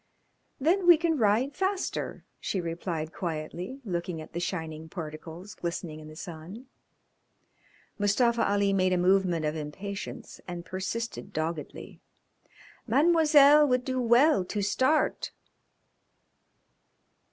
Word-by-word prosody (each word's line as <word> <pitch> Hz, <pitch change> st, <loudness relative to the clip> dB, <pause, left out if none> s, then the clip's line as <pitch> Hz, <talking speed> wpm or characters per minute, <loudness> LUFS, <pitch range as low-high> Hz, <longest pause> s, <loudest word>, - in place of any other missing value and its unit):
"Then 350 Hz, +6 st, +2 dB
we 345 Hz, -2 st, +9 dB
can 325 Hz, -2 st, 0 dB
ride 230 Hz, +6 st, +2 dB
faster," 385 Hz, 0 st, -2 dB
she 195 Hz, -, -2 dB
replied 165 Hz, -2 st, -4 dB
quietly, 175 Hz, -, -5 dB
looking 175 Hz, -3 st, -3 dB
at 155 Hz, -, -10 dB
the 170 Hz, -, -2 dB
shining 160 Hz, -3 st, -4 dB
particles 165 Hz, +3 st, -8 dB
glistening 170 Hz, -2 st, -5 dB
in 155 Hz, -, -11 dB
the 155 Hz, -, -11 dB
sun. 175 Hz, +8 st, -9 dB, 1.3 s
Mustafa 235 Hz, +3 st, +2 dB
Ali 200 Hz, -1 st, +2 dB
made 185 Hz, -1 st, +2 dB
a -, -, +2 dB
movement 180 Hz, -3 st, +2 dB
of 150 Hz, +1 st, -1 dB
impatience 190 Hz, +7 st, -7 dB
and 175 Hz, -1 st, -6 dB
persisted 200 Hz, +3 st, -4 dB
doggedly. 155 Hz, 0 st, -5 dB, 0.9 s
"Mademoiselle 300 Hz, +1 st, +6 dB
would 250 Hz, -1 st, +1 dB
do 255 Hz, -1 st, -1 dB
well 240 Hz, 0 st, +4 dB
to 205 Hz, +3 st, -3 dB
start." 260 Hz, +9 st, +1 dB
195 Hz, 115 wpm, -28 LUFS, 170-255 Hz, 1.3 s, we